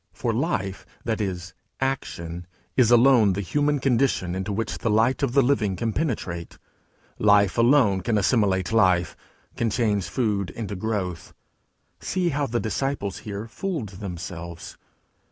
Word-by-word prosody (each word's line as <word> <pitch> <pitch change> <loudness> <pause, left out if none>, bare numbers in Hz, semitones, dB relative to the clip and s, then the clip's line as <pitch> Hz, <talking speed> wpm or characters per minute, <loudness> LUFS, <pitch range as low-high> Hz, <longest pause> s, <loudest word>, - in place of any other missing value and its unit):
For - - -2
life, 95 0 -2 0.2
that 110 -2 -1
is, 90 -3 -4 0.3
action, 90 -10 -3 0.3
is 125 -4 +4
alone 120 -4 +6
the 100 - -2
human 145 - +1
condition 125 -9 +1
into 95 +2 -3
which 110 +2 -3
the 115 - -1
light 115 +6 +2
of 135 -4 0
the 140 0 +5
Living 110 -7 +1
can 110 +4 -2
penetrate; 100 - -3 0.6
life 100 -2 +4
alone 115 -5 +4
can 110 +3 0
assimilate 100 -3 +2
life, 90 -6 +3 0.4
can 115 - 0
change 105 -4 0
food 105 -7 0
into 105 +3 -5
growth. 95 -4 -3 0.6
See 180 -2 -1
how 145 -2 -1
the 120 0 -1
disciples 110 -2 -2
here 105 +1 -6
fooled 155 - -4
themselves! 85 -3 -7
105 Hz, 140 wpm, -24 LUFS, 95-125 Hz, 0.6 s, alone